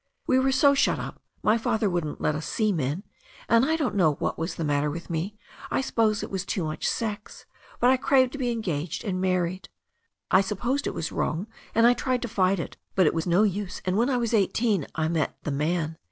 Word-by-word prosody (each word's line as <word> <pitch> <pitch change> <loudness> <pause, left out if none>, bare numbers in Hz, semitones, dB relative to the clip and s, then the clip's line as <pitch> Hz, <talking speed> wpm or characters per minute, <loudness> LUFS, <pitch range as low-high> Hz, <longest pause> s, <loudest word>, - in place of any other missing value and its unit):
We 260 - +3
were 265 +1 +2
so 280 +2 +5
shut 275 - +2
up - - -7
— - - -40
^my 215 +2 +4
father 225 -2 +1
wouldn't 175 -5 -2
let 155 - +1
us 150 +1 -4
see 215 -2 +1
men 155 +1 -2 0.2
— - - -22
and 230 +1 +5
I 315 +4 +2
don't 295 -8 -1
know 175 -7 +3
what - - -2
was 165 +3 -3
the 165 - -3
matter 145 0 +1
with 170 +3 -6
me, 175 +6 -3 0.3
I - - +1
suppose 220 -5 +1
it - - -6
was 190 -1 -2
too 190 - -2
much 155 0 -2
sex 210 -2 -4 0.2
— - - -23
^but - - +7
I 260 - +5
craved 260 -1 +3
to 280 - -7
be 250 -2 0
engaged 175 -9 -3
and 185 -3 -2
married. 185 0 -1 0.6
I 185 - +6
supposed 240 +8 -1
it - - -3
was 160 - -3
wrong 165 +6 -1 0.3
and 230 +1 +5
I 240 - +7
tried 250 0 -1
to - - -2
fight 195 -4 +1
it, - - -6 0.2
but 185 - +4
it - - +3
was 165 +1 -2
no 175 +4 +4
use^ 200 -2 -1
and 185 0 0
when 235 +5 +2
I 255 - +2
was 235 -1 -1
eighteen 210 - +2
I 160 0 0
met 160 -2 -1
the 150 - -2
man. 160 +2 -1
195 Hz, 240 wpm, -26 LUFS, 165-235 Hz, 0.6 s, ^but